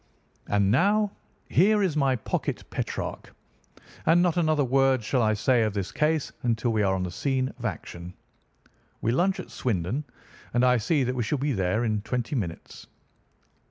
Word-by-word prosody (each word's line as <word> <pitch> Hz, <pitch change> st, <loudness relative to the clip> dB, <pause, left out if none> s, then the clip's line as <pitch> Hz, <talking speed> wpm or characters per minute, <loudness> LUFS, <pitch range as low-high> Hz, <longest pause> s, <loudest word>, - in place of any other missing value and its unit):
And 100 Hz, -1 st, +2 dB
now 205 Hz, -, +3 dB, 0.4 s
here 205 Hz, +3 st, +4 dB
is 180 Hz, -6 st, 0 dB
my 135 Hz, -3 st, +2 dB
pocket 115 Hz, -, -3 dB
Petrarch, -, -, -4 dB, 0.7 s
and 165 Hz, +2 st, +6 dB
not 175 Hz, -3 st, +2 dB
another 155 Hz, -4 st, +2 dB
word 135 Hz, -1 st, +2 dB
shall 125 Hz, +3 st, +1 dB
I 110 Hz, -1 st, +2 dB
say 120 Hz, +3 st, +2 dB
of 110 Hz, -2 st, 0 dB
this 100 Hz, -2 st, -3 dB
case 155 Hz, -1 st, 0 dB
until 115 Hz, 0 st, 0 dB
we 110 Hz, -, +1 dB
are 95 Hz, -2 st, +2 dB
on 95 Hz, -, -2 dB
the 90 Hz, -, -4 dB
scene 130 Hz, +6 st, -1 dB
of 120 Hz, -, -6 dB
action. 90 Hz, -3 st, -6 dB, 0.9 s
We 115 Hz, -, +1 dB
lunch 185 Hz, +9 st, +1 dB
at -, -, -8 dB
Swindon, 115 Hz, -, -2 dB, 0.5 s
and 120 Hz, +1 st, +4 dB
I 125 Hz, 0 st, +4 dB
see 135 Hz, +6 st, +1 dB
that 125 Hz, 0 st, -1 dB
we 125 Hz, -, -2 dB
shall 115 Hz, +6 st, 0 dB
be 140 Hz, +1 st, -1 dB
there 95 Hz, +2 st, 0 dB
in 105 Hz, -2 st, 0 dB
twenty 120 Hz, +3 st, -3 dB
minutes." 90 Hz, -9 st, -5 dB
125 Hz, 175 wpm, -26 LUFS, 105-150 Hz, 0.9 s, and